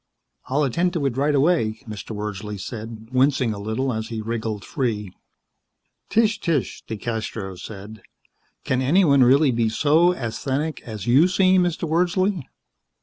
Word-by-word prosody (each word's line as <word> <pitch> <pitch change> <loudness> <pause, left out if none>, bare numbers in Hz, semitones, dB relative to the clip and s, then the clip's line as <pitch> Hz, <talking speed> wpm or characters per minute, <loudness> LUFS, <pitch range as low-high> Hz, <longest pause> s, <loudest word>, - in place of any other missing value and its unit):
"I'll 145 +3 +1
attend 170 +7 0
to 160 -6 -1
it 130 -4 0
right 145 +2 +1
away," 135 -7 +2
Mr. 110 0 -7
Wordsley 105 0 -5
said, 110 +1 -7
wincing 130 -2 +2
a 100 - -7
little 110 +5 -2
as 110 0 -3
he 115 -1 -5
wriggled 110 -2 -4
free. 110 - -2 1.0
"Tch, 220 -1 +2
tch," 160 -7 -1
DeCastros 110 -4 -4
said, 105 +2 -9 0.6
"can 130 0 0
anyone 140 -1 +4
really 135 +3 +5
be 115 -2 +1
so 155 +9 +3
asthenic 135 +3 -3
as 110 -4 -7
you 135 +8 +5
seem, 185 0 +4
Mr. 175 -1 -1
Wordsley?" 180 0 +1
130 Hz, 145 wpm, -23 LUFS, 110-160 Hz, 1.0 s, really